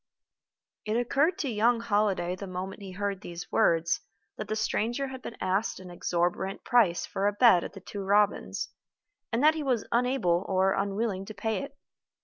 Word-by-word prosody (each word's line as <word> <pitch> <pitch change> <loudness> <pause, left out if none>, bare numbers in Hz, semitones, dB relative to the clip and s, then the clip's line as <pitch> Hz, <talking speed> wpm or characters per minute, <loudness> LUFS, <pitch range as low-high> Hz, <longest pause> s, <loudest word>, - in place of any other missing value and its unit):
It 215 +1 -1
occurred 280 +8 +2
to 285 - -2
young 230 +2 +3
Holliday, 205 -5 +1
the 195 +1 -7
moment 185 +2 -5
he 190 -2 -8
heard 200 0 -3
these 175 -4 -8
words, 165 0 +3 0.4
that 215 - -6
the 215 - -2
stranger 235 +5 -1
had 260 -1 -8
been 235 - -8
asked 190 +4 0
an 185 -1 -10
exorbitant 175 +2 -1
price 220 -9 +3
for 195 +1 -1
a 205 - +1
bed 205 -5 +6
at - - -7
The 195 - -10
Two 200 +1 -7
Robins, 205 - +1 0.6
and 235 +4 0
that 310 +1 +7
he 320 - -3
was 255 -6 0
unable 235 -8 +2
or 190 0 +3
unwilling 195 0 -1
to 215 - -9
pay 220 +3 -1
it. 280 0 -9
205 Hz, 180 wpm, -28 LUFS, 190-235 Hz, 0.6 s, that